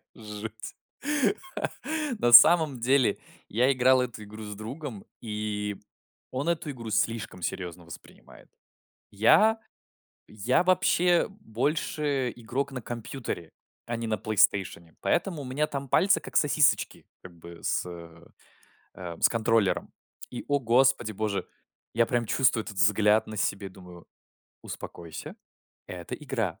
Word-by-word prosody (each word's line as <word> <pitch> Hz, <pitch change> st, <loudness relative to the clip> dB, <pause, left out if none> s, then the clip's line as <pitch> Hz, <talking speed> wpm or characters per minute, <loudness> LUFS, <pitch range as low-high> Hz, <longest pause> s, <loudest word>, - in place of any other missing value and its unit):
Жуть. 110 Hz, 0 st, -8 dB, 1.4 s
На 120 Hz, -, +2 dB
самом 150 Hz, 0 st, +8 dB
деле 130 Hz, +1 st, +2 dB, 0.3 s
я 125 Hz, +5 st, +3 dB
играл 130 Hz, 0 st, +4 dB
эту 120 Hz, -4 st, -5 dB
игру 110 Hz, +1 st, -10 dB
с 105 Hz, 0 st, -7 dB
другом, 115 Hz, +1 st, -7 dB, 0.2 s
и 105 Hz, -2 st, -3 dB, 0.5 s
он 135 Hz, +6 st, -2 dB
эту 160 Hz, -3 st, -2 dB
игру 115 Hz, -4 st, -8 dB
слишком 110 Hz, -4 st, -1 dB
серьезно 90 Hz, -1 st, -5 dB
воспринимает. 85 Hz, -, -14 dB, 0.6 s
Я 210 Hz, -, +4 dB, 0.7 s
я 110 Hz, -, +1 dB
вообще 180 Hz, -1 st, +3 dB
больше 145 Hz, -, -2 dB
игрок 130 Hz, +5 st, -3 dB
на 130 Hz, -, -5 dB
компьютере, 115 Hz, -, -6 dB, 0.3 s
а 120 Hz, -, -3 dB
не 115 Hz, 0 st, -4 dB
на 110 Hz, -1 st, 0 dB
"Плейстейшене". 95 Hz, -5 st, +1 dB
Поэтому 170 Hz, -4 st, 0 dB
у -, -, -8 dB
меня 135 Hz, +4 st, -1 dB
там 140 Hz, -2 st, -5 dB
пальцы 190 Hz, +9 st, +4 dB
как -, -, -8 dB
сосисочки, -, -, +2 dB, 0.2 s
как 90 Hz, -2 st, -12 dB
бы 85 Hz, 0 st, -12 dB
с -, -, 0 dB
э, 85 Hz, -1 st, -11 dB, 0.7 s
э, 85 Hz, -2 st, -7 dB
с -, -, +6 dB
контроллером. 115 Hz, -3 st, +1 dB, 0.4 s
И 120 Hz, -, -7 dB
о 145 Hz, -, +2 dB
господи 125 Hz, -1 st, +3 dB
боже, 105 Hz, -1 st, -2 dB, 0.5 s
я 115 Hz, 0 st, +3 dB
прям 120 Hz, 0 st, 0 dB
чувствую 115 Hz, -4 st, +2 dB
этот 100 Hz, -, -9 dB
взгляд 105 Hz, +2 st, +4 dB
на 110 Hz, -, -8 dB
себе, 100 Hz, -1 st, -1 dB
думаю: 90 Hz, -2 st, -14 dB, 0.6 s
"Успокойся, 85 Hz, -3 st, -8 dB, 0.5 s
это 90 Hz, -2 st, -6 dB
игра". -, -, -3 dB
115 Hz, 130 wpm, -27 LUFS, 100-135 Hz, 1.4 s, самом